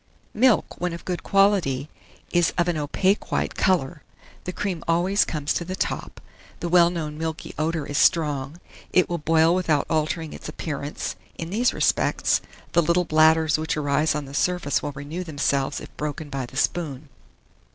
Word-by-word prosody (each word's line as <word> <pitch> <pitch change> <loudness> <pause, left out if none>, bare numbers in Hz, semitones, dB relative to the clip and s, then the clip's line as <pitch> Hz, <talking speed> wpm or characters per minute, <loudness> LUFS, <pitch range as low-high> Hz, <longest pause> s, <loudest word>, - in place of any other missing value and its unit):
MILK, 235 -4 +2
when 180 -1 -1
of 170 - -8
good 180 -1 -3
quality, 195 -9 +2 0.4
is 175 -2 +2
of 175 0 +2
an 175 - +1
opaque 185 +7 0
white - - 0
colour: 170 -4 +1 0.4
the 180 - -2
cream 180 -3 -3
always 180 +5 +3
comes 150 -2 -2
to - - -2
the 185 +2 -5
top; - - -3 0.4
the 175 - -3
well 170 -1 +6
known 155 -3 -4
milky 160 -1 -4
odour 160 -1 -1
is 145 - -1
strong; 150 -2 +2 0.3
it 185 - +4
will 170 -1 -2
boil 160 +2 +4
without 165 -6 +1
altering 160 0 -1
its - - -8
appearance, 145 -2 -4 0.2
in 165 +1 -5
these 240 +5 +2
respects; - - +1 0.3
the 170 - +4
little 170 +2 +2
bladders 155 0 +4
which 155 0 -2
arise 150 +1 +1
on 150 -1 -3
the 135 - -11
surface 180 -1 0
will 145 - -3
renew 150 +6 -5
themselves 140 -3 -1
if - - -12
broken 150 0 -4
by 135 -3 -3
the 130 - -10
spoon. 150 -2 -1
160 Hz, 170 wpm, -24 LUFS, 150-175 Hz, 0.4 s, well